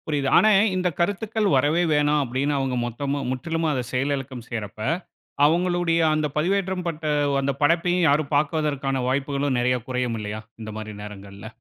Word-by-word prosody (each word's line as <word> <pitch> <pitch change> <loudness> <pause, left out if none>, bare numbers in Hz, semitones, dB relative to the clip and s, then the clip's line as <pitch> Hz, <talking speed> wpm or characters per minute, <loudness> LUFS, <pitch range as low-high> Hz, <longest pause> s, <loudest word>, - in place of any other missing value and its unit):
புரியுது. 145 -3 0
ஆனா, 215 - +6 0.3
இந்த 180 -1 +1
கருத்துக்கள் 210 +4 0
வரவே 150 +6 +2
வேணாம். 150 0 +3
அப்படின்னு 135 +4 -1
அவங்க 135 -2 -1
மொத்தமா, 140 +4 -3
முற்றிலும் 160 +5 -1
அதை 130 -3 -1
செயலிழக்கம் 135 -2 -2
செய்யறப்ப, 110 -3 -6 0.7
அவங்களுடைய 175 +1 +2
அந்த 155 0 +1
பதிவேற்றம் 185 +2 0
பட்ட 165 -1 -4 0.4
அந்த 140 +1 0
படைப்பையும் 175 +3 +3
யாரும் 145 0 +1
பாப்பதற்கான 145 -3 0
வாய்ப்புகளும் 140 0 0
நெறைய 125 +1 +2
குறையும் 125 -2 -1
இல்லயா, 105 +1 -5 0.2
இந்த 110 0 -6
மாரி 110 0 -6
நேரங்கள்ல. 100 0 -10
145 Hz, 145 wpm, -24 LUFS, 125-165 Hz, 0.7 s, ஆனா